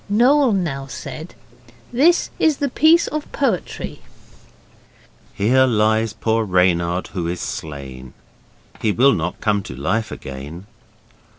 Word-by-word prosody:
Noel 255 +5 +4
now 145 -8 -2
said, 155 +5 -8 0.6
'This 315 +8 +3
is 315 -3 +3
the 285 - -1
piece 320 +6 +4
of 305 -1 -5
poetry': 240 -10 -2 1.3
'Here 125 +6 +3
lies 110 -1 +2
poor 115 0 0
Reynard 90 -2 +1
who 85 -3 -3
is 85 +1 -3
slain, 65 -4 -7 0.7
He 110 - +2
will 135 +6 +4
not 85 +2 -3
come 105 -2 +1
to 65 - -9
life 105 - -1
again. 70 +6 -8
110 Hz, 120 wpm, -20 LUFS, -, 1.3 s, Noel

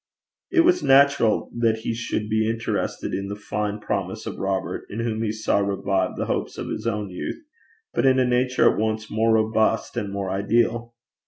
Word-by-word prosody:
It 340 - +5
was 355 +1 +4
natural 135 -4 +4
that 115 -2 +1
he 115 - -2
should 115 -2 -3
be 110 0 +1
interested 115 +1 -2
in 100 +1 -2
the 100 - -4
fine 105 0 -3
promise 100 0 -3
of 110 - -6
Robert, 95 -1 -2
in 110 +3 -4
whom 110 -1 -2
he 110 -2 0
saw 110 -1 0
revived 100 -2 0
the - - -1
hopes - - -2
of - - -5
his - - -4
own 105 -3 -2
youth, 90 - -5 0.5
but - - +2
in 130 0 +5
a 130 - +3
nature 125 +1 +3
at - - -3
once 110 0 -2
more 110 +1 +2
robust 110 +1 +1
and 105 -4 -3
more 100 -1 -3
ideal. 115 +4 0
110 Hz, 190 wpm, -24 LUFS, 100-120 Hz, 0.5 s, It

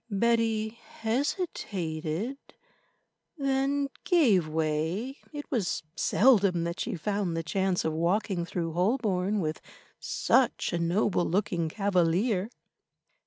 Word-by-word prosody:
Betty 225 0 +1
hesitated, 220 - -3 1.0
then 275 0 +1 0.2
gave 235 - +4
way. 160 - -1
It 290 -1 -6
was 215 -12 -1
seldom 200 -8 +4
that 170 +2 -3
she - - -2
found 195 -1 -1
the 165 - -2
chance 190 +2 0
of 160 - 0
walking 175 +3 0
through 170 -1 -3
Holborn 200 0 +1
with 155 -1 -3 0.4
such - - +1
a 170 - 0
noble 175 +2 +1
looking 175 -3 0
cavalier. 195 +2 +1
195 Hz, 105 wpm, -28 LUFS, 170-230 Hz, 1.0 s, gave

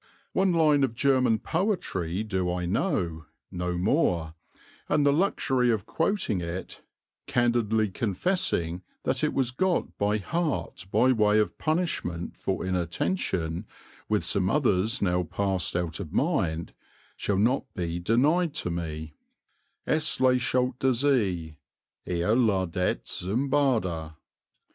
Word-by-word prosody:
One 190 0 +3
line 155 -4 +4
of 120 -4 0
German 130 -2 +3
poetry 110 - -1
do 95 -4 -1
I 90 0 -2
know 85 - -1 0.2
no 90 -1 -2
more 90 - +1 0.6
and 145 - +3
the 140 - +5
luxury 135 -7 +1
of 110 -4 0
quoting 165 - 0
it 85 +2 -6 0.5
(candidly 115 -3 +2
confessing 95 - -1 0.2
that 130 +2 0
it 150 - +2
was 130 -3 0
got 180 +7 0
by 105 +1 +2
heart 140 - -3
by 130 - +4
way 105 -3 +3
of 105 - +1
punishment 155 - -1
for - - -3
inattention, 90 - -1 0.4
with - - +1
some 95 -1 +1
others 115 -5 +1
now 90 -1 +2
passed 95 0 -1
out 85 -1 -2
of 85 -6 -6
mind), 90 - 0 0.4
shall 100 - -1
not 125 +6 +1
be 85 -1 -2
denied 145 - +2
to 90 - -2
me 80 -2 -5 0.7
Es 155 0 +1
lächelt 125 -1 +2
der 130 -1 +3
see, 100 - 0 0.5
er 90 +4 +1
ladet 95 -7 +1
züm 120 +10 -2
Bade. 90 - +1
105 Hz, 125 wpm, -27 LUFS, 90-135 Hz, 0.7 s, the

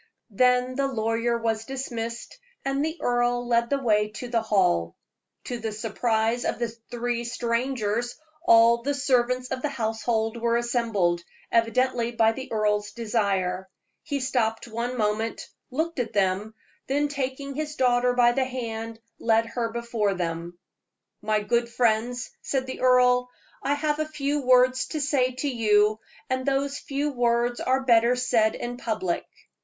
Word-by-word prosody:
Then 250 +3 +3
the 275 0 +2
lawyer 230 -1 0
was 225 -1 -1
dismissed, 235 - -5 0.3
and 275 +1 0
the 320 +2 -2
earl 245 0 +1
led 235 0 +2
the 280 - +2
way 210 -5 +2
to 245 +3 -6
the 235 -2 +1
hall. 180 - +1 0.5
To 245 -1 -4
the 220 -1 -3
surprise 225 +2 0
of - - -1
the 235 -1 -1 0.2
three 240 0 -2
strangers, 235 -1 -1 0.3
all 235 -5 +6
the 285 +4 -1
servants 250 -2 +1
of 260 -1 -3
the 295 - -1
household 225 -2 -1
were 235 0 +1
assembled, 225 -8 0 0.3
evidently 235 +1 +2
by 225 -1 +3
the 260 +3 -8
earl's 210 -1 0
desire. 195 -5 -1 0.3
He 285 -3 -3
stopped 240 -4 -1
one 235 +2 -3
moment, 220 +1 -1 0.2
looked 320 +4 -2
at 235 -2 -2
them, 200 +2 0 0.3
then 290 +2 +1
taking 275 0 -4
his 300 +1 -4
daughter 245 -1 +3
by 240 -1 +5
the 260 +2 +1
hand, 230 -3 -5 0.2
led 225 0 +3
her 230 0 -3
before 230 -4 -1
them. 170 0 -4 0.6
"My 215 0 +1
good 235 +3 0
friends," 235 0 0
said 265 -2 -1
the 260 - -7
earl, 250 -1 +4 0.3
"I 285 - +1
have 300 +1 -1
a 310 - 0
few 295 -1 -1
words 255 0 +4
to 310 - -4
say 270 -3 +1
to 260 +3 -3
you, 215 -4 +3 0.3
and 260 0 -1
those 280 +1 0
few 285 +1 -2
words 240 -1 +1
are 260 +1 +1
better 235 -1 +4
said 240 -3 +2
in 245 0 -5
public. 215 -8 -2
240 Hz, 155 wpm, -26 LUFS, 225-255 Hz, 0.6 s, all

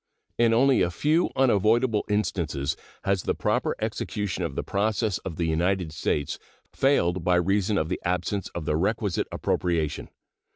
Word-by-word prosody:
In 115 -1 +4
only 130 +1 +4
a 90 - +2
few 150 - +1
unavoidable 115 -2 +3
instances 85 -9 -1 0.3
has 100 -1 +1
the - - -1
proper - - 0
execution 100 -3 -3
of 80 -5 -3
the - - -2
process 105 -1 0
of 85 - -6
the 85 - -1
United 85 +1 0
States 75 -2 -2 0.3
failed 95 -11 +2
by 90 0 +3
reason 95 +3 +1
of 80 - 0
the 90 - -3
absence 90 +2 -1
of 85 - -4
the 75 - 0
requisite 100 +1 0
appropriation. 80 -4 -1
95 Hz, 155 wpm, -26 LUFS, 85-110 Hz, 0.3 s, In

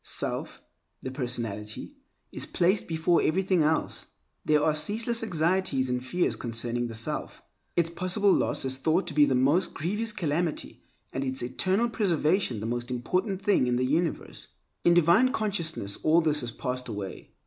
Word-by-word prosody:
Self, - - -3 0.4
the 130 - -4
personality, 120 - -4 0.4
is - - -5
placed 185 +3 +1
before 165 +1 +2
everything 185 +1 +2
else. 155 +1 0 0.4
There 150 -1 +3
are 155 - +3
ceaseless 225 +9 -1
anxieties 165 - 0
and 125 0 -1
fears 175 +7 +1
concerning 120 +1 -2
the 115 - -6
self. 115 - -3 0.3
Its 170 -1 +2
possible 185 +3 +2
loss - - 0
is 130 0 -1
thought 160 +7 +1
to - - -4
be 145 0 +6
the 135 - +1
most 140 +8 +2
grievous 210 +8 -1
calamity, 170 -4 -2 0.3
and 135 - -2
its 130 -1 -3
eternal 185 - +1
preservation 175 - +1
the - - -4
most 120 +2 -3
important 185 - -1
thing 195 -11 +3
in 125 - +1
the 125 +1 +1
universe. 160 +4 -2 0.4
In 175 - +5
divine 175 +10 +5
consciousness 170 - -2
all 160 +2 +3
this 150 -2 +2
has 120 -1 -3
passed 125 0 -4
away. 100 -4 -6
155 Hz, 160 wpm, -27 LUFS, 125-185 Hz, 0.4 s, be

